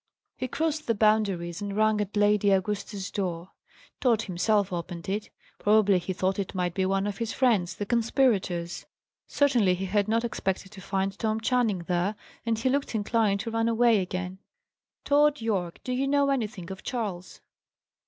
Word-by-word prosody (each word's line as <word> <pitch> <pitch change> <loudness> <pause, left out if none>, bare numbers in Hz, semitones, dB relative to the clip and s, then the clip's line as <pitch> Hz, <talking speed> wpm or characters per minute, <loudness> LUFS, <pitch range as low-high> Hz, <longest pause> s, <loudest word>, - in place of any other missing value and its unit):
He 255 - -3
crossed 310 +3 -2
the 230 - +2
Boundaries, 205 -5 +1
and 205 0 -4
rang 215 -1 +3
at 205 0 -4
Lady 205 0 +3
Augusta's 200 0 -1
door. 180 -2 -3 0.5
Tod 230 -4 +2
himself 200 +1 +1
opened 175 +1 -5
it. 205 +2 -2 0.3
Probably 205 -2 +4
he 175 +2 -4
thought 185 +1 -1
it 195 0 -4
might 180 -2 -1
be 190 0 0
one 195 +1 +1
of 205 -1 -4
his 230 -1 -2
friends, 220 -9 +2
the 205 - -4
conspirators; 215 -7 0 0.4
certainly 240 -10 +3
he 190 +2 -4
had 200 +2 +1
not 230 +2 +1
expected 195 -4 -3
to 200 -2 -11
find 195 +1 -1
Tom 220 0 0
Channing 225 -6 +1
there, 180 +4 0 0.3
and 225 -1 +1
he 230 - -1
looked 275 -2 0
inclined 210 -2 +1
to 230 - -5
run 225 0 +1
away 230 -1 +4
again. 185 0 -4 0.7
"Tod 295 0 +4
Yorke, 195 -7 -2
do 250 - -3
you 265 +2 0
know 280 0 +3
anything 215 -9 -3
of 190 - -7
Charles?" 205 -8 -4
205 Hz, 175 wpm, -27 LUFS, 190-230 Hz, 0.7 s, Probably